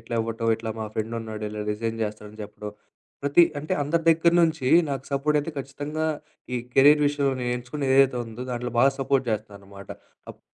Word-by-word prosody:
ఇట్లా 115 +1 -6
ఇవ్వటం 115 0 -1
ఇట్లా 110 0 -5
మా 110 - -3
ఫ్రెండున్నాడు 110 -1 -4
ఇలా 105 0 -6
డిజైన్ 115 +1 -3
జేస్తాడని 105 0 -6
చెప్పడం, 105 0 -8 0.5
ప్రతి 145 +4 +5 0.2
అంటే 155 - -4
అందరి 165 +4 0
దగ్గర 165 +1 +3
నుంచి 160 -5 +1 0.2
నాకు 135 -1 -3
సపోర్టైతే 150 +2 +1
ఖచ్చితంగా 145 +3 -4 0.5
ఈ 125 - 0 0.2
కెరీర్ 145 +2 +6
విషయంలో 140 -2 +1
నేనెంచుకునేదైతే 130 +2 +1
ఉందో 115 +3 -8
దాంట్లో 120 0 -4
బాగా 135 +2 +6
సపోర్ట్ 135 0 +1
చేస్తాననమాట. 100 -2 -6 0.4
అప్ - - -16
125 Hz, 155 wpm, -25 LUFS, 110-145 Hz, 0.5 s, కెరీర్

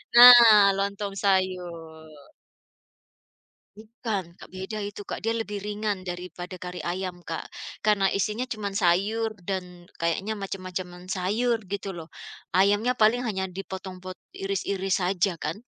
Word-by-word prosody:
Nah 235 -5 +10
lontong 200 0 -2
sayur. 170 -6 -2 1.5
Bukan, 215 -6 -5
Kak. - - -14
Beda 190 +3 -5
itu 205 0 -7
Kak. - - -5
Dia 225 - 0
lebih 210 -3 -3
ringan 210 -2 -3
daripada 180 0 -7
kari 180 -1 -7
ayam 180 0 -4
Kak. 165 -1 -5 0.4
Karena 200 -2 +3
isinya 210 +4 -1
cuman 210 -5 -5
sayur 205 +4 +2 0.2
dan 180 -2 -5
kayaknya 190 +6 -1
macam-macam 185 -2 -6
sayur, 215 +5 0
gitu 200 -2 -4
loh. 165 -1 -9 0.4
Ayamnya 205 +6 +2
paling 225 +3 +4
hanya 195 -6 -2
dipotong-pot 185 -1 -8 0.2
iris-iris 195 0 -1
saja 180 -1 0
kan. 155 - -3
195 Hz, 120 wpm, -26 LUFS, 180-210 Hz, 1.5 s, Nah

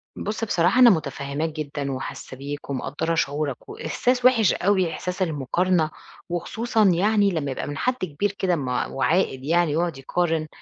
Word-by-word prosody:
بُصّ 210 +1 -4
بصراحة 190 +1 +2
أنا 250 -2 +9
متفهّماك 155 -3 -1
جدًا 145 -2 -4
وحاسّة 130 0 -6
بيك 145 +1 -7
ومقدّرة 145 +5 -2
شعورك، 145 -3 -2
وإحساس 250 +10 -1
وِحِش 230 -6 +5
أوي 185 -3 +1
إحساس 180 +3 -5
المقارنة، 165 +2 +1 0.4
وخصوصًا 220 +6 0
يعني 200 +3 +3
لمّا 145 -5 -2
يبقى 130 - -4
من 145 0 -5
حد 250 +9 +1
كبير 185 - -2
كده 190 -3 0
م 135 -5 -4
وعاقل 135 +4 0
يعني 165 -1 +2
ويقعد 170 -3 0
يقارن، 160 +3 -1
165 Hz, 155 wpm, -24 LUFS, 145-190 Hz, 0.4 s, أنا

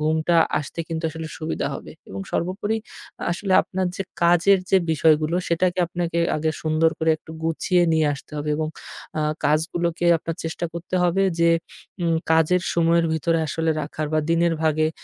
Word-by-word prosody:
ঘুমটা 160 +2 +1 0.2
আসতে 150 +3 -6
কিন্তু 165 0 -4
আসলে 160 0 -6
সুবিধা 155 +1 -2
হবে। - - -8 0.2
এবং 95 0 -6
সর্বোপরি 195 +5 -1 0.6
আসলে 190 +2 -2
আপনার 185 0 -2
যে 195 - -2 0.2
কাজের 175 +3 +5
যে 195 - +6 0.2
বিষয়গুলো 155 +1 +3
সেটাকে 175 +2 +1
আপনাকে 170 -1 -2 0.2
আগে 155 +1 0
সুন্দর 160 +1 +2
করে 160 0 +2
একটু - - -15
গুছিয়ে 175 +2 +1
নিয়ে 160 -1 +3
আসতে 140 - -13
হবে 150 +1 -4
এবং 155 0 -1 0.5
আ - - +1 0.3
কাজগুলোকে 170 +3 0
আপনার 165 0 -5
চেষ্টা 165 +1 -3
করতে 170 +2 -6
হবে 180 +2 +2 0.2
যে, 170 - +5 0.5
উম 165 -1 +2 0.2
কাজের 160 +3 +3
সময়ের 170 0 +3
ভিতরে 165 +1 +1
আসলে 160 +3 0
রাখার 155 +1 -4
বা - - +3
দিনের 170 0 +3
ভাগে 155 0 +2
165 Hz, 165 wpm, -23 LUFS, 155-175 Hz, 0.6 s, যে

